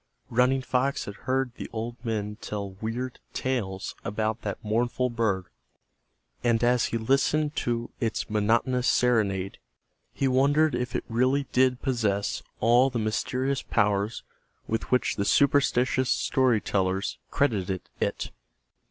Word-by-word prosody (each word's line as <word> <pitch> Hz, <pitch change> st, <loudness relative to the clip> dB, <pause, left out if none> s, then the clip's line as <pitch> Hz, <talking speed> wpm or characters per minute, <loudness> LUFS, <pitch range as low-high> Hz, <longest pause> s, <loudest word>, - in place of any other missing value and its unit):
Running 125 Hz, +3 st, +3 dB
Fox 130 Hz, +2 st, 0 dB
had 100 Hz, -, -6 dB
heard 130 Hz, +4 st, -1 dB
the -, -, -6 dB
old 115 Hz, +1 st, -4 dB
men 105 Hz, -3 st, -2 dB
tell 100 Hz, -2 st, -4 dB
weird 115 Hz, +6 st, -4 dB
tales 100 Hz, -8 st, -2 dB
about 110 Hz, +3 st, -2 dB
that 100 Hz, -2 st, -3 dB
mournful 120 Hz, +3 st, 0 dB
bird, 105 Hz, -6 st, 0 dB, 1.0 s
and 115 Hz, -1 st, +2 dB
as 120 Hz, 0 st, +3 dB
he 115 Hz, -, -1 dB
listened 140 Hz, +6 st, +1 dB
to 120 Hz, 0 st, -1 dB
its 115 Hz, -3 st, -1 dB
monotonous 115 Hz, +4 st, +1 dB
serenade 100 Hz, -7 st, +1 dB, 0.5 s
he 135 Hz, -, 0 dB
wondered 145 Hz, +4 st, +3 dB
if 125 Hz, 0 st, -2 dB
it -, -, -2 dB
really 130 Hz, +4 st, +1 dB
did 130 Hz, 0 st, +2 dB
possess 110 Hz, -7 st, 0 dB, 0.2 s
all 120 Hz, +4 st, +5 dB
the 125 Hz, -, -3 dB
mysterious 125 Hz, +5 st, -1 dB
powers 105 Hz, 0 st, 0 dB, 0.4 s
with 115 Hz, -, -2 dB
which 125 Hz, -, +1 dB
the 100 Hz, -, +1 dB
superstitions 130 Hz, 0 st, +3 dB
story 130 Hz, -4 st, +2 dB
tellers 95 Hz, -1 st, -1 dB
credited 95 Hz, -9 st, 0 dB, 0.2 s
it. -, -, -2 dB
120 Hz, 130 wpm, -27 LUFS, 105-130 Hz, 1.0 s, all